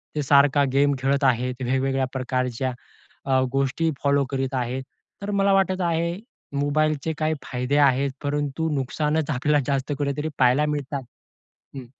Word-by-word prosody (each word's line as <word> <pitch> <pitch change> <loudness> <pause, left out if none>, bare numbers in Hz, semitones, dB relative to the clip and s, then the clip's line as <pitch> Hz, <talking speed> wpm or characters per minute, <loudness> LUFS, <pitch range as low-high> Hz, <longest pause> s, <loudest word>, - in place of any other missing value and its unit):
ते 150 - 0
सारखा 140 +1 +5
गेम 140 +1 +3
खेळत 140 +2 +1
आहेत, 125 0 +1
वेगवेगळ्या 135 +1 0
प्रकारच्या 130 -1 -2 0.5
अ, 135 -1 +3
गोष्टी 135 +4 0
फॉलो 140 0 +3
करीत 135 0 -2
आहेत. 125 +1 -2 0.4
तर 205 +1 -3
मला 200 0 +3
वाटत 190 -1 +2
आहे, 170 0 0 0.4
मोबाईलचे 155 +2 0
काही 155 0 0
फायदे 125 +3 -1
आहेत, 140 -1 +3
परंतु 145 +2 -1
नुकसानच 150 +3 -1
आपल्याला 145 +3 +2
जास्त 140 0 -1
कुठेतरी 145 +2 -1
पाहायला 130 +3 +4
मिळतात 145 -2 -3 0.7
हं. 130 -2 -7
140 Hz, 140 wpm, -24 LUFS, 130-150 Hz, 0.7 s, सारखा